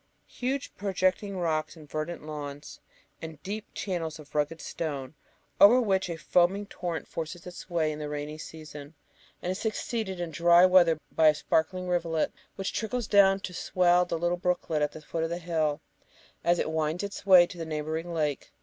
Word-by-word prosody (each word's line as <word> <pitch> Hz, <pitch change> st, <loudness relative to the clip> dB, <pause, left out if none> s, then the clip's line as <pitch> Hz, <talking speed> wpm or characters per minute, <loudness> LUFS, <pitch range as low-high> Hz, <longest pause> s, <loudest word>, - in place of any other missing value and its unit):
Huge, 265 Hz, +2 st, -3 dB
projecting 190 Hz, 0 st, 0 dB
rocks 155 Hz, -3 st, -1 dB
and 155 Hz, -2 st, -13 dB
verdant 155 Hz, +2 st, -4 dB
lawns, 145 Hz, -2 st, -7 dB, 0.4 s
and 160 Hz, -2 st, -8 dB
deep 210 Hz, +2 st, -5 dB
channels 170 Hz, -5 st, -3 dB
of 150 Hz, -2 st, -14 dB
rugged 150 Hz, +2 st, 0 dB
stone, 145 Hz, -4 st, -4 dB, 0.5 s
over 225 Hz, +6 st, +8 dB
which 190 Hz, -6 st, +1 dB
a 170 Hz, -, -3 dB
foaming 180 Hz, +5 st, +2 dB
torrent 175 Hz, -4 st, -5 dB
forces 165 Hz, +1 st, -6 dB
its 180 Hz, +1 st, -9 dB
way 165 Hz, -3 st, +1 dB
in 150 Hz, -, -6 dB
the 150 Hz, -1 st, -4 dB
rainy 150 Hz, +1 st, -5 dB
season, 155 Hz, -1 st, -10 dB, 0.5 s
and 180 Hz, -, -1 dB
is 185 Hz, -, -4 dB
succeeded 220 Hz, -3 st, -2 dB
in 175 Hz, -2 st, -3 dB
dry 170 Hz, +3 st, +6 dB
weather 180 Hz, -3 st, +5 dB
by 160 Hz, -, +4 dB
a 155 Hz, -, +6 dB
sparkling 180 Hz, +5 st, 0 dB
rivulet, 170 Hz, -3 st, 0 dB, 0.2 s
which 195 Hz, -, -3 dB
trickles 230 Hz, +2 st, -2 dB
down 195 Hz, -1 st, +5 dB
to 180 Hz, -, -6 dB
swell 180 Hz, 0 st, +3 dB
a -, -, 0 dB
little 175 Hz, +2 st, 0 dB
brooklet 175 Hz, -3 st, -1 dB
at 150 Hz, -, +1 dB
the 155 Hz, -, -9 dB
foot 160 Hz, +2 st, -3 dB
of 165 Hz, -, -1 dB
the 170 Hz, -, -2 dB
hill, 160 Hz, -4 st, -1 dB, 0.6 s
as 175 Hz, 0 st, +3 dB
it 160 Hz, -, -1 dB
winds 160 Hz, +3 st, -1 dB
its 200 Hz, 0 st, -5 dB
way 180 Hz, -2 st, +9 dB
to 175 Hz, -1 st, -11 dB
the -, -, -2 dB
neighbouring 160 Hz, +2 st, -3 dB
lake. 150 Hz, -4 st, -2 dB
170 Hz, 185 wpm, -28 LUFS, 155-185 Hz, 0.6 s, way